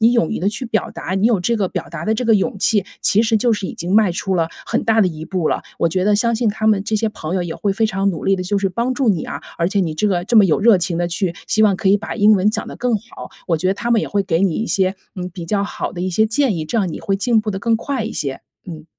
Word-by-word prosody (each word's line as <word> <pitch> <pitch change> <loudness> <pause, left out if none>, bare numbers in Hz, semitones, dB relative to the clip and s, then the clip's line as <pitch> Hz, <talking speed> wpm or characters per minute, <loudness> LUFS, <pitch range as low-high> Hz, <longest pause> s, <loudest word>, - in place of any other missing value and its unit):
你 230 +2 +5
勇 230 -10 +2
于 - - -2
地 190 - +1
去 215 +5 -4
表 220 -1 -1
达， 185 - -5
你 195 +3 +2
有 230 -4 +3
这 235 +7 0
个 200 -4 0
表 - - -5
达 165 0 -6
的 220 - +1
这 245 +3 -2
个 225 - +4
勇 200 0 0
气， 205 0 +2 0.2
其 210 - +3
实 225 -1 +2
就 235 +2 +2
是 205 -3 -2
已 - - -6
经 175 +3 -3
迈 215 -3 +5
出 190 +2 -2
了 165 -2 +1 0.2
很 - - 0
大 225 -1 +3
的 200 - +4
一 160 -2 -7
步 180 -3 -1
了。 - - -1 0.2
我 170 - +2
觉 185 +3 -1
得 210 +1 +3
相 230 +3 +1
信 225 0 +1
他 215 +1 -3
们 210 -3 +3
这 220 - -2
些 220 +1 0
朋 175 -5 -5
友 185 - 0
也 170 -2 -5
会 200 - -1
非 220 +3 +1
常 195 -1 0
努 165 -5 -6
力 195 - +3
地 185 - -3
就 200 +3 0
是 195 0 0
帮 235 +7 -1
助 255 -1 0
你 185 -6 +1
啊， - - -6 0.2
而 170 0 +1
且 200 0 0
你 165 -4 -1
这 185 +7 0
个， 180 -3 0
这 230 - +1
么 210 - +8
有 175 0 +2
热 220 0 +6
情 175 -1 -2
地 175 0 0
去 175 0 -1
希 215 - +2
望 200 -3 +4
可 190 - 0
以 200 - +5
把 220 +2 -6
英 210 +1 +5
文 200 +1 +2
讲 - - -4
得 - - -8
更 245 -1 0
好， 230 +4 -10 0.2
我 170 - +1
觉 185 +4 -1
得 190 - +1
他 235 +3 -3
们 230 -2 +4
也 - - -3
会 200 -1 0
给 170 -3 0
你 190 -5 +2
一 225 - -2
些， 190 -2 +1 0.2
嗯， 180 -1 -4
比 175 -3 -6
较 200 +3 0
好 - - -4
的 175 - -6
一 185 - -1
些 215 +5 +3
建 225 -1 +1
议， 160 - -3
这 230 +9 -1
样 190 -5 0
你 - - -6
会 195 - -1
进 230 +3 +2
步 215 - -2
得 195 - -3
更 225 +3 +1
快 255 0 -3
一 225 - -4
些， 135 -2 -4 0.3
嗯。 160 -4 -8
200 Hz, 355 characters per minute, -19 LUFS, 180-220 Hz, 0.3 s, 么